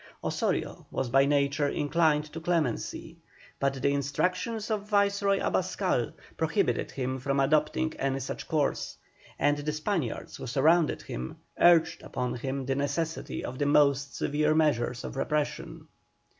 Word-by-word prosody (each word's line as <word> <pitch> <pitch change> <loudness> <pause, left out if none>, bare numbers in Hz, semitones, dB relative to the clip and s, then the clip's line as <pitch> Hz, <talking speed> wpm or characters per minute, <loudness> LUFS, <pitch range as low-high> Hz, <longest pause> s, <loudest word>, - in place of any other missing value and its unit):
Osorio - - -2
was 120 - -3
by 135 +2 +5
nature 145 0 +2
inclined 150 +1 +2
to 165 - -5
clemency, 165 -7 -2 0.4
but 140 0 +1
the 140 - +3
instructions 180 - -1
of 210 -1 -2
Viceroy 200 -1 +2
Abascal - - 0 0.2
prohibited - - 0
him 130 0 -3
from 140 +1 0
adopting 155 +2 +2
any 135 0 0
such 135 - -5
course, 150 -3 -1 0.4
and 145 0 +2
the 150 +1 -2
Spaniards 155 - -3
who - - -7
surrounded 155 +6 +3
him 60 +2 -6 0.2
urged 170 -2 +5
upon 125 -1 -3
him 135 +2 -3
the 135 - 0
necessity 155 +4 -2
of 130 +1 -6
the 145 - +1
most 140 -1 +3
severe 150 +1 +1
measures 125 -6 +1
of - - -6
repression. 150 +2 -2
145 Hz, 140 wpm, -28 LUFS, 135-160 Hz, 0.4 s, by